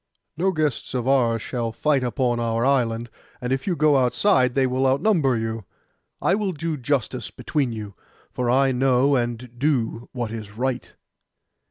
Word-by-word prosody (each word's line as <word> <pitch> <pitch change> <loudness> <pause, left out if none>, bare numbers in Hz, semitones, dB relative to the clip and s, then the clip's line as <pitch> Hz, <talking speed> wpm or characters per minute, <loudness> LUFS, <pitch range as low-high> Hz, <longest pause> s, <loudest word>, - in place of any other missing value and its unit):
'No 185 +4 +1
guests 155 -7 -2
of 125 0 -1
ours 120 -5 +2
shall 120 -3 -3
fight 140 +3 +1
upon 120 -1 0
our 115 0 0
island, 120 -4 +1 0.3
and 125 +1 -1
if 135 +6 -3
you 180 - +1
go 155 -2 +4
outside 125 0 +3
they 135 -1 +3
will 130 +1 +1
outnumber 140 - +2
you. 110 0 -3 0.6
I - - +2
will 200 -2 0
do 160 +1 -3
justice 130 -3 -2
between 140 -5 -2
you, 105 -3 -6 0.4
for 125 -1 -2
I 135 +2 +4
know 130 +2 +3
and 120 0 -3
do 125 -5 0
what 120 -4 -4
is 110 -2 -7
right. 125 0 -2
125 Hz, 165 wpm, -23 LUFS, 120-140 Hz, 0.6 s, go